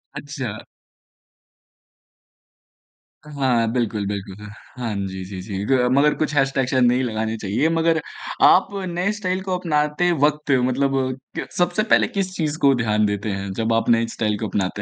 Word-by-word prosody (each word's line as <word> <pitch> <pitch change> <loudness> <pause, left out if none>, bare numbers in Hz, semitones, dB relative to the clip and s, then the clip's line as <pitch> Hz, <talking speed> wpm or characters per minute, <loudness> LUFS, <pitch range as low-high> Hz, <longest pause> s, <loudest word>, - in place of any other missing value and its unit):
अच्छा। 140 -7 -6 2.6
हाँ 130 -6 0
बिल्कुल, 110 -4 -1
बिल्कुल। 100 0 -6 0.3
हाँ 115 -3 -3
जी, 95 0 -6
जी, 95 0 -7
जी 100 0 -6
ग 135 - +1 0.2
मगर 150 +1 +4
कुछ 155 -1 -1
हैशटैग 135 -1 +2
शायद 130 0 +2
नहीं 125 +1 +3
लगाने 110 -1 -2
चाहिए। 105 +9 0
मगर 165 0 +2 0.5
आप 185 - +5 0.3
नए 180 +4 +1
स्टाइल 185 -2 -1
को 185 -1 -1
अपनाते 150 0 +1
वक़्त 150 0 0
मतलब 135 +2 +1 0.4
क - - -4
सबसे 180 +4 +2
पहले 220 - +3
किस 190 -2 -3
चीज़ 155 -2 -2
को 140 -1 +5
ध्यान 105 -3 +1
देते 105 +1 -2
हैं 95 0 -4
जब 115 +3 0
आप 115 - +1
नई 115 0 +3
स्टाइल 110 -2 -1
को 110 - -2
अपनाते 100 0 -2
125 Hz, 160 wpm, -22 LUFS, 105-150 Hz, 2.6 s, आप